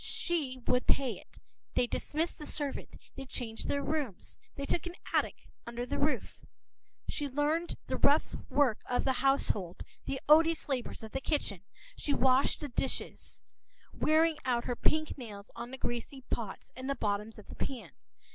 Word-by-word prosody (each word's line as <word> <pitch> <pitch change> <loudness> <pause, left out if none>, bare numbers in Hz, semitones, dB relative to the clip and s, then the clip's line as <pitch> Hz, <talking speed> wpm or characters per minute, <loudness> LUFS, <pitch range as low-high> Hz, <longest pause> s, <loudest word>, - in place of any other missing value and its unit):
She 300 -7 -1
would 250 0 +2
pay 270 -3 +3
it. - - -19 0.4
They - - +4
dismissed 315 +8 -1
the 300 - -5
servant; 285 -2 -2 0.2
they 270 - -6
changed 230 -4 -4
their 280 - +1
rooms; 290 - -2 0.2
they 280 - -3
took 345 +4 0
an 350 - -6 0.2
attic - - +1 0.2
under 235 +1 -3
the - - -2
roof. 295 +2 0 0.6
She 290 -2 -2
learned 300 +5 +1
the - - -1
rough - - +4 0.2
work 265 -7 +4
of 245 - +1
the 265 - +3
household, 210 -10 +2 0.2
the 270 - -2
odious 320 +2 +6
labors 260 -5 -2
of 220 - -7
the 270 - -2
kitchen. 255 - 0 0.3
She 290 - 0
washed 260 +1 +4
the 295 - -3
dishes, 260 +2 -3 0.5
wearing 315 0 +4
out 240 -2 +1
her 245 - 0
pink 310 +3 +1
nails 210 -4 -8
on 240 - -5
the 265 - -6
greasy 255 +2 -3
pots 215 -5 -3
and 260 +2 -5
the 275 - +1
bottoms 210 -1 -1
of 210 - -11
the - - -10
pans. 265 -3 -4
270 Hz, 170 wpm, -32 LUFS, 240-295 Hz, 0.6 s, odious